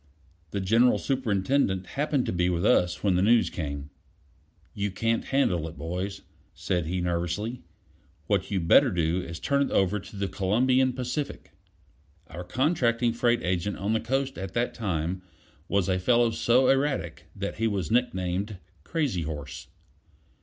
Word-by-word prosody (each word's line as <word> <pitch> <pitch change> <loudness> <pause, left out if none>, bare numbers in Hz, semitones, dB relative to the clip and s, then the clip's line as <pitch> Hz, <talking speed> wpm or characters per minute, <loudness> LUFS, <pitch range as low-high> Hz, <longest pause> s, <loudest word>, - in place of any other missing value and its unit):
The 100 - -3
General 115 +6 +4
Superintendent 110 -5 0
happened 145 +3 -1
to - - -2
be 90 0 +1
with 90 +1 0
us 90 -7 +2
when 100 -3 +3
the 90 - +2
news 115 +3 +4
came. 70 -3 -5 0.8
"You 100 0 -2
can't 115 +4 -1
handle 90 - +1
it, 80 - -10
boys," 90 +4 -4 0.3
said 90 -4 -1
he 90 +2 -1
nervously. 90 +7 -2 0.6
"What 100 0 0
you'd 95 -5 -1
better - - +6
do 85 +1 0
is 85 -2 -7
to - - -6
turn 140 0 +2
it 140 - +1
over 95 +2 +2
to 100 - -12
the 100 0 -2
Columbian 125 +8 +2
Pacific." 130 +3 -4 0.7
Our 85 +1 -8
contracting 120 - +1
freight 120 -1 +1
agent 90 +3 -1
on 100 +3 -1
the 110 - +2
Coast 135 +3 -2
at 95 -1 -6
that 120 +1 0
time 90 -4 -2 0.5
was 100 -2 +1
a 95 -1 +1
fellow 120 +4 +3
so 125 +3 +3
erratic 135 +1 0
that 100 0 -4
he 115 - +2
was 100 -7 -2
nicknamed 100 -4 0 0.3
"Crazy 145 - -1
horse." 75 -2 -6
100 Hz, 160 wpm, -27 LUFS, 90-120 Hz, 0.8 s, better